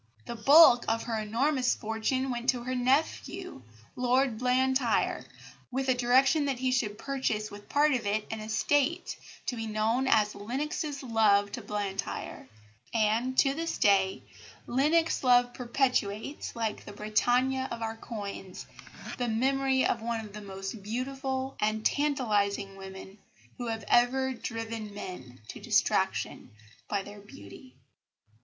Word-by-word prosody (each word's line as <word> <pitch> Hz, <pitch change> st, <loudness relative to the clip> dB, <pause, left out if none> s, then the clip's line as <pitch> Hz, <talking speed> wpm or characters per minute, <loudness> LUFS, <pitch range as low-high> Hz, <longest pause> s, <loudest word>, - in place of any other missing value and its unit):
The -, -, -5 dB
bulk 275 Hz, +1 st, +7 dB
of 225 Hz, 0 st, 0 dB
her 225 Hz, -2 st, -2 dB
enormous 250 Hz, +5 st, +1 dB
fortune 235 Hz, +4 st, -1 dB
went 240 Hz, +1 st, -2 dB
to 245 Hz, -2 st, +1 dB
her 255 Hz, +1 st, -3 dB
nephew, 270 Hz, -, -1 dB, 0.3 s
Lord 250 Hz, -1 st, +1 dB
Blantyre, 255 Hz, 0 st, +1 dB, 0.4 s
with 265 Hz, +1 st, -2 dB
a -, -, +5 dB
direction 260 Hz, +5 st, +3 dB
that 275 Hz, -3 st, -1 dB
he 260 Hz, +1 st, 0 dB
should 215 Hz, -5 st, 0 dB
purchase 235 Hz, -6 st, -2 dB
with 205 Hz, 0 st, -12 dB
part 295 Hz, +1 st, +3 dB
of 240 Hz, -5 st, -1 dB
it 210 Hz, +1 st, 0 dB
an 225 Hz, -, -4 dB
estate, 265 Hz, +8 st, 0 dB, 0.3 s
to 245 Hz, -, -2 dB
be 225 Hz, -1 st, -4 dB
known 220 Hz, +5 st, 0 dB
as 210 Hz, -4 st, +3 dB
"Lennox's 275 Hz, +6 st, -4 dB
Love 210 Hz, -4 st, +3 dB
to -, -, -5 dB
Blantyre"; 200 Hz, -2 st, -4 dB, 0.4 s
and 230 Hz, +4 st, +1 dB
to 275 Hz, -1 st, +4 dB
this 330 Hz, +3 st, -3 dB
day 195 Hz, -2 st, +3 dB, 0.4 s
"Lennox 305 Hz, +7 st, +2 dB
Love" 245 Hz, -1 st, +4 dB
perpetuates, 250 Hz, -1 st, -1 dB
like 225 Hz, -2 st, -3 dB
the 205 Hz, -, -10 dB
Britannia 245 Hz, +5 st, +1 dB
of 230 Hz, -1 st, -5 dB
our 225 Hz, 0 st, -3 dB
coins, 200 Hz, -4 st, -7 dB, 0.5 s
the 245 Hz, -, 0 dB
memory 265 Hz, +3 st, +1 dB
of 230 Hz, -, 0 dB
one 225 Hz, -1 st, -3 dB
of 205 Hz, -, -12 dB
the 210 Hz, -, -7 dB
most 195 Hz, +1 st, -7 dB
beautiful 265 Hz, +4 st, -3 dB
and 215 Hz, +1 st, 0 dB
tantalising 210 Hz, -9 st, 0 dB
women 190 Hz, +1 st, -10 dB, 0.4 s
who 240 Hz, -, -4 dB
have 225 Hz, -2 st, -4 dB
ever 260 Hz, +2 st, +3 dB
driven 225 Hz, -3 st, -5 dB
men 180 Hz, -11 st, -8 dB
to -, -, -7 dB
distraction -, -, 0 dB, 0.4 s
by 200 Hz, -1 st, -1 dB
their 205 Hz, +1 st, -11 dB
beauty. 125 Hz, -, -13 dB
235 Hz, 140 wpm, -29 LUFS, 210-265 Hz, 0.5 s, bulk